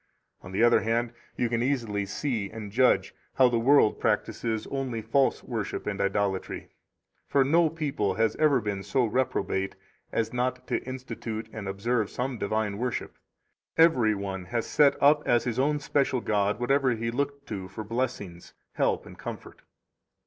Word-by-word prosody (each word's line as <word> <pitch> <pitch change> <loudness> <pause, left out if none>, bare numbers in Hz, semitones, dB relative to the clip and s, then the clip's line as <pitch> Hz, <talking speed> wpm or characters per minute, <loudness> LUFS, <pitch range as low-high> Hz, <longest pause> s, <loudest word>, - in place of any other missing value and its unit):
17 - - -11
On - - -9
the 105 +5 +3
other 120 - +5
hand, 115 +1 0 0.2
you 120 - +1
can 115 0 -1
easily 115 -7 -1
see 110 -1 -2
and 105 -3 -8
judge 125 +4 +3 0.2
how 130 - +6
the 120 -1 +1
world 130 -2 +4
practises 110 -2 -1
only 130 -4 -2
false 135 +5 +1
worship 110 -5 -4
and 105 -1 -2
idolatry. 100 -1 -1 0.6
For 140 - +3
no 160 +4 +4
people 145 -10 -1
has 110 0 +1
ever 150 -4 +4
been 100 -2 -3
so 120 +6 +1
reprobate 105 -5 -1 0.4
as 115 0 -1
not 125 +1 -1
to - - 0
institute 120 -4 -5
and 105 -3 -6
observe 105 +3 0
some 125 -1 -3
divine 105 0 -1
worship; 125 -1 -3 0.6
every 130 -10 +5
one 95 -2 -5
has 115 +5 -2
set 145 -2 +4
up 145 +1 +6
as 120 -1 +3
his 120 0 -2 0.3
special 135 -2 +1
god 105 -2 0
whatever 135 +1 +2
he 115 +1 -2
looked 140 +2 -2
to 95 -3 -4
for 110 - -7
blessings, 105 -6 -4 0.2
help, - - 0
and - - -13
comfort. - - -8
115 Hz, 165 wpm, -27 LUFS, 105-130 Hz, 0.6 s, how